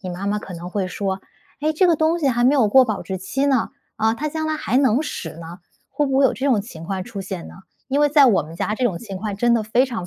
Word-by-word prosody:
你 185 - -6
妈 180 +3 -5
妈 205 +1 0
可 190 - -9
能 170 +1 -7
会 190 -1 -2
说： 190 0 -3 0.4
“诶， 310 +1 +2
这 340 +4 +3
个 345 - +4
东 320 +2 +2
西 305 - 0
还 240 -2 +1
没 265 +4 +5
有 260 -6 +4
过 260 +5 +6
保 215 -4 -3
质 190 -1 -5
期 270 +9 -1
呢， 265 -5 +1 0.3
啊， 220 +1 +2
它 305 +5 -3
将 315 +1 -3
来 310 - -1
还 255 -5 -1
能 260 -2 +3
使 160 - -6
呢。” 170 +2 -10 0.3
会 295 - 0
不 270 -1 0
会 275 - +5
有 265 - +4
这 265 - -3
种 245 -7 +3
情 175 -6 -10
况 190 +1 -3
出 225 -4 -7
现 190 -3 -6
呢？ - - -12 0.3
因 275 +1 0
为 295 - +4
在 290 -1 +6
我 225 -6 +3
们 155 +2 -11
家 210 - -1
这 255 - -2
种 190 -8 0
情 200 -5 -7
况 205 +1 -4
真 240 +3 +3
的 230 - +1
非 230 +4 +2
常 230 -8 -5
230 Hz, 315 characters per minute, -21 LUFS, 195-275 Hz, 0.4 s, 过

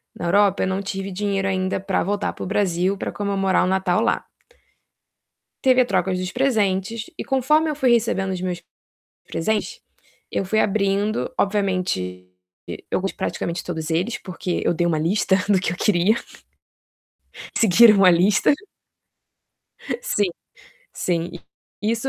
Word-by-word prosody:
na 175 - -5
Europa, 200 +2 +3
eu - - 0
não 190 +1 -1
tive 195 0 -5
dinheiro 195 0 -1
ainda 185 0 -1
pra 195 0 -1
voltar 205 +2 -2
para - - -7
o - - -4
Brasil 190 -1 0
para - - -4
comemorar 195 -2 0
o - - +1
Natal 190 +1 +1
lá. 235 - 0 1.4
Teve 255 -1 +5
a - - +2
troca 190 -5 0
dos 185 0 -2
presentes 220 -4 0
e - - -4
conforme 300 +4 +2
eu 300 - -2
fui 260 -4 +2
recebendo 210 -5 +1
os 185 -1 -4
meus 180 -2 -4 0.6
presentes, 220 - -2 0.5
eu - - -1
fui 215 +3 0
abrindo, 200 +1 0
obviamente, 185 - -1 0.6
eu - - 0
gos 195 +1 -2
de - - -27
praticamente 170 +1 -3
todos 160 -2 -4
eles, 185 +9 0
porque 180 -1 -4
eu - - +3
dei 175 +1 0
uma 160 - +1
lista 190 +5 +2
do 200 -3 +3
que 180 - -1
eu 175 - -5
queria. 200 +2 +3 1.4
Seguiram 215 0 +6
a - - +9
lista. 185 +10 +4 1.5
Sim, 205 - +1 0.7
sim. 170 -1 -2 0.5
isso 230 +5 0
195 Hz, 150 wpm, -22 LUFS, 180-215 Hz, 1.5 s, a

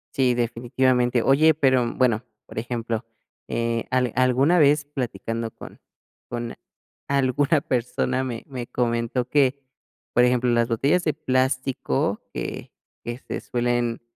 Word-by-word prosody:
Sí, 130 -2 +3
definitivamente. 120 +1 +1
Oye, 155 +4 +5
pero, 130 -5 +2
bueno, 120 -3 +2 0.2
por - - -13
ejemplo, 115 0 -3 0.5
eh, 115 0 -1
al 125 -2 +1
alguna 130 +7 +3
vez 145 0 +4
platicando 115 -5 -4
con - - -12 0.5
con 120 -1 -4 0.6
alguna 140 +2 +2
persona 125 0 -1
me 120 -3 -5
me 125 -3 -5
comentó 120 +1 -1
que, 140 0 +2 0.5
por 120 - +5
ejemplo, 125 0 +2
las 115 0 +2
botellas 140 +10 +2
de 155 - +1
plástico 130 - 0
que - - -5 0.3
que 120 0 -4
se - - -6
suelen 120 -1 -1
125 Hz, 125 wpm, -24 LUFS, 120-135 Hz, 0.6 s, Oye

